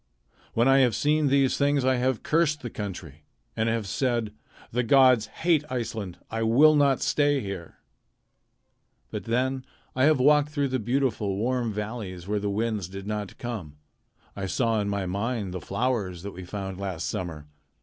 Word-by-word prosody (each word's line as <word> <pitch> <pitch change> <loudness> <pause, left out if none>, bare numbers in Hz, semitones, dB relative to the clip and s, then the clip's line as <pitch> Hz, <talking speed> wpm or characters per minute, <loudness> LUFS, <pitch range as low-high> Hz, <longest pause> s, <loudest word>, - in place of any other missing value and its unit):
When 115 +3 +3
I 135 0 +6
have 125 -4 +3
seen 150 0 +2
these 135 -1 +3
things 140 -2 +2
I 130 -1 +3
have 125 -1 0
cursed 150 -2 +2
the 120 - -5
country, 85 -8 -7 0.3
and 110 +1 +1
have 115 -2 -1
said: 115 +1 -1 0.4
'The 125 - +1
gods 125 -2 +5
hate 160 -3 +1
Iceland. 110 -7 -4
I 110 0 -2
will 135 +8 +6
not 140 -3 +3
stay 145 -1 +2
here.' 95 -7 -7 1.3
But - - -5
then 130 +3 0 0.3
I 130 +1 +3
have 155 -2 +4
walked 145 +2 +4
through 145 -2 -1
beautiful 115 -4 0
warm 120 +1 0
valleys 105 -4 -5
where 105 0 0
the 100 0 -2
winds 105 -3 -1
did 95 +1 -8
not 105 -1 -4
come. 100 -12 -6 0.6
I 95 -1 -3
saw 115 +1 +1
in 100 - -2
my 100 -1 -1
mind 100 +1 -2
the 90 - -5
flowers 100 -5 -2
that 100 - -5
we 95 -1 -9
found 95 0 -5
last 95 -4 -3
summer. 80 -5 -4
115 Hz, 170 wpm, -26 LUFS, 100-130 Hz, 1.3 s, I